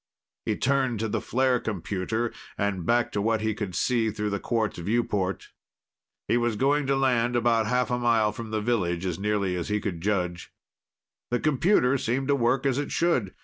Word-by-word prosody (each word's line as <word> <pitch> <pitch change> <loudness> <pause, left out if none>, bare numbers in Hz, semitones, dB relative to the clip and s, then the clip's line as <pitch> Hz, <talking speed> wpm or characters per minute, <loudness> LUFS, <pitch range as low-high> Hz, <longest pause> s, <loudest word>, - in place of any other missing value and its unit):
He - - +1
turned 130 -4 +1
to 110 - 0
the - - -2
flare 130 0 +1
computer 110 +3 -2 0.2
and 100 -4 -1
back 120 0 +2
to 105 - -1
what 110 +1 +1
he 110 0 0
could 100 -4 -5
see 115 +3 +1
through 105 -1 -3
the 100 - -1
quartz 110 -6 -1
viewport. 100 -2 -1 0.8
He 120 - +3
was 120 -2 0
going 140 +5 +1
to 135 - +2
land 120 -3 +2
about 115 -2 +2
half 125 +1 +1
a 125 - +1
mile 115 -3 +3
from 110 +1 -7
the 110 0 -1
village, 95 -6 0
as 90 -2 -2
nearly 100 -2 0
as 90 - -3
he 105 0 +1
could 90 -5 -4
judge. 90 -3 -2 0.8
The 120 - 0
computer 140 -3 +3
seemed 130 +4 -1
to 140 - +4
work 125 +1 +1
as 135 0 +2
it 145 - -3
should. 130 - +1
115 Hz, 190 wpm, -26 LUFS, 100-125 Hz, 0.8 s, to